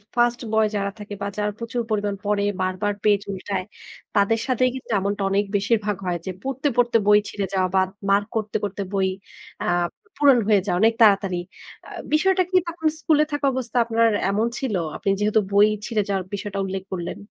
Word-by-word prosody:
First 240 Hz, 0 st, +2 dB
boy 220 Hz, 0 st, +4 dB
যারা 200 Hz, -1 st, -1 dB
থাকে 205 Hz, 0 st, -8 dB
বা, 200 Hz, -, -1 dB
যারা 210 Hz, 0 st, 0 dB
প্রচুর 230 Hz, +1 st, -3 dB
পরিমাণ 205 Hz, -2 st, -1 dB
পড়ে, 205 Hz, 0 st, +1 dB, 0.2 s
বারবার 185 Hz, +2 st, -1 dB
পেজ 205 Hz, -2 st, +3 dB
উল্টায়, 190 Hz, -1 st, -3 dB, 0.5 s
তাদের 205 Hz, +2 st, +3 dB
সাথেই 255 Hz, 0 st, +2 dB
কিন্তু 260 Hz, -, -9 dB
এমনটা 200 Hz, +1 st, -2 dB
অনেক 200 Hz, +1 st, +1 dB
বেশিরভাগ 210 Hz, 0 st, +1 dB
হয়। 175 Hz, -1 st, 0 dB
যে 190 Hz, -, -3 dB
পড়তে, 270 Hz, +2 st, -2 dB
পড়তে 240 Hz, -1 st, +4 dB
বই 210 Hz, 0 st, +7 dB
ছিঁড়ে 200 Hz, -2 st, -3 dB
যাওয়া 185 Hz, -1 st, +2 dB
বা, 190 Hz, -, +5 dB, 0.3 s
মার্ক 205 Hz, +1 st, +3 dB
করতে, 215 Hz, -1 st, -3 dB
করতে 200 Hz, 0 st, -3 dB
বই 195 Hz, -1 st, +2 dB, 0.6 s
আ -, -, -3 dB, 0.4 s
পু -, -, -30 dB
পুরনো 275 Hz, -5 st, +5 dB
হয়ে 205 Hz, -3 st, +5 dB
যাওয়া 175 Hz, -3 st, 0 dB
অনেক 225 Hz, +1 st, +5 dB
তাড়াতাড়ি। 195 Hz, -4 st, +4 dB, 0.5 s
আ -, -, -11 dB, 0.2 s
বিষয়টা 375 Hz, +4 st, +3 dB
কি 370 Hz, -, +3 dB
তখন 325 Hz, -2 st, -2 dB
স্কুলে 305 Hz, -1 st, +3 dB
থাকা 290 Hz, -1 st, -1 dB
অবস্থা 250 Hz, -1 st, -3 dB
আপনার 230 Hz, 0 st, +3 dB, 0.2 s
এমন 215 Hz, +3 st, +1 dB
ছিল? 255 Hz, -6 st, -2 dB, 0.2 s
আপনি 195 Hz, -, -2 dB
যেহেতু 210 Hz, +1 st, +3 dB
বই 200 Hz, +1 st, +6 dB, 0.2 s
ছিঁড়ে 220 Hz, -3 st, 0 dB
যাওয়ার 190 Hz, -2 st, 0 dB
বিষয়টা 200 Hz, 0 st, -4 dB
উল্লেখ 190 Hz, 0 st, -4 dB
করলেন? 175 Hz, -2 st, -4 dB
210 Hz, 190 wpm, -23 LUFS, 200-235 Hz, 0.6 s, বই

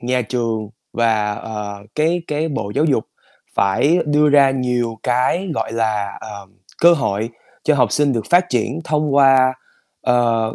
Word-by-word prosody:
nhà 125 Hz, +1 st, 0 dB
trường 115 Hz, -2 st, -3 dB, 0.2 s
và, 110 Hz, -3 st, +1 dB
ờ, 105 Hz, -1 st, -6 dB, 0.2 s
cái 165 Hz, +3 st, +1 dB
cái 155 Hz, +2 st, -2 dB
Bộ 135 Hz, -9 st, -4 dB
Giáo 145 Hz, +3 st, +2 dB
dục 135 Hz, -8 st, +1 dB, 0.5 s
phải 145 Hz, -, +2 dB
đưa 150 Hz, 0 st, +3 dB
ra 140 Hz, -2 st, +5 dB
nhiều 125 Hz, -3 st, -2 dB
cái, 130 Hz, +9 st, 0 dB
gọi 110 Hz, -1 st, -3 dB
là, 110 Hz, -3 st, -2 dB
ờm, 100 Hz, -3 st, -10 dB, 0.3 s
cơ 170 Hz, +1 st, +8 dB
hội 110 Hz, -8 st, -1 dB, 0.4 s
cho 155 Hz, -, +3 dB
học 125 Hz, -6 st, +2 dB
sinh 145 Hz, -2 st, +2 dB
được 115 Hz, -3 st, -3 dB
phát 180 Hz, +1 st, +4 dB
triển 125 Hz, +4 st, -1 dB
thông 150 Hz, -2 st, 0 dB
qua, 135 Hz, -2 st, +5 dB, 0.5 s
ờ, 115 Hz, -3 st, +1 dB
125 Hz, 160 wpm, -19 LUFS, 110-145 Hz, 0.5 s, cơ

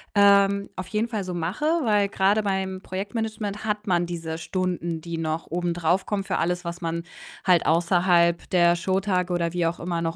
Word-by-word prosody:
ähm, 200 Hz, 0 st, +4 dB
auf 185 Hz, -1 st, -5 dB
jeden 215 Hz, +2 st, -1 dB
Fall 215 Hz, -5 st, -2 dB
so 180 Hz, -, -4 dB
mache, 175 Hz, -, -3 dB, 0.2 s
weil 210 Hz, -3 st, +3 dB
grade 200 Hz, +3 st, +2 dB
beim 190 Hz, -1 st, -2 dB
Projektmanagement 210 Hz, +1 st, -4 dB
hat 210 Hz, 0 st, -2 dB
man 175 Hz, -1 st, +2 dB
diese 165 Hz, -2 st, -5 dB
Stunden, 175 Hz, -2 st, -2 dB
die 170 Hz, 0 st, -5 dB
noch 160 Hz, 0 st, -3 dB
obendrauf 175 Hz, +1 st, 0 dB
kommen 200 Hz, -2 st, -2 dB
für 190 Hz, -, -1 dB
alles, 175 Hz, +1 st, -1 dB
was 170 Hz, +1 st, -5 dB
man 170 Hz, 0 st, -2 dB, 0.4 s
halt 180 Hz, -3 st, +4 dB
außerhalb 170 Hz, +1 st, +3 dB
der 175 Hz, -1 st, +4 dB
Showtage 185 Hz, 0 st, 0 dB
oder 170 Hz, -1 st, 0 dB
wie 175 Hz, -1 st, 0 dB
auch 170 Hz, -, -3 dB
immer 170 Hz, -1 st, -2 dB
noch 165 Hz, 0 st, -2 dB
180 Hz, 185 wpm, -25 LUFS, 170-200 Hz, 0.4 s, ähm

